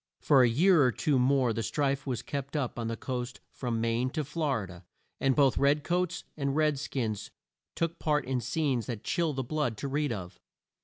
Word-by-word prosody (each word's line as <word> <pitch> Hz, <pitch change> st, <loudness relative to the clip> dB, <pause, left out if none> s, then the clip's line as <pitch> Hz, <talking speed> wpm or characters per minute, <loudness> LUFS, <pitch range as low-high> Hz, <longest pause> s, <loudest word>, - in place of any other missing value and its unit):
For 140 Hz, -3 st, +5 dB
a 125 Hz, -, +5 dB
year 165 Hz, +7 st, +5 dB
or 125 Hz, -, +4 dB
two 140 Hz, -1 st, +1 dB
more 130 Hz, -2 st, +3 dB
the 115 Hz, -, -2 dB
strife 140 Hz, +4 st, -1 dB
was 125 Hz, -3 st, -2 dB
kept 140 Hz, 0 st, -5 dB
up 130 Hz, -5 st, -2 dB
on 115 Hz, -, -2 dB
the 115 Hz, 0 st, -3 dB
coast 125 Hz, -1 st, -4 dB
from 120 Hz, -3 st, -3 dB
Maine 115 Hz, +2 st, +1 dB
to 155 Hz, -, -1 dB
Flor 145 Hz, -5 st, -1 dB
i -, -, -5 dB
da, 85 Hz, -1 st, -11 dB, 0.4 s
and 135 Hz, -1 st, +2 dB
both 140 Hz, -3 st, +4 dB
red 140 Hz, +1 st, +3 dB
coats 175 Hz, 0 st, -1 dB
and 140 Hz, -2 st, -1 dB
red 150 Hz, -2 st, +2 dB
skins 115 Hz, -8 st, -3 dB, 0.5 s
took 165 Hz, 0 st, -2 dB
part 150 Hz, -3 st, +1 dB
in 130 Hz, -1 st, -1 dB
scenes 125 Hz, -2 st, -1 dB
that 115 Hz, -4 st, -5 dB
chill 170 Hz, -4 st, 0 dB
the 135 Hz, -1 st, -2 dB
blood 140 Hz, -4 st, -1 dB
to 140 Hz, -, -4 dB
read 145 Hz, +1 st, 0 dB
of. 95 Hz, -5 st, -6 dB
135 Hz, 210 wpm, -29 LUFS, 120-150 Hz, 0.5 s, For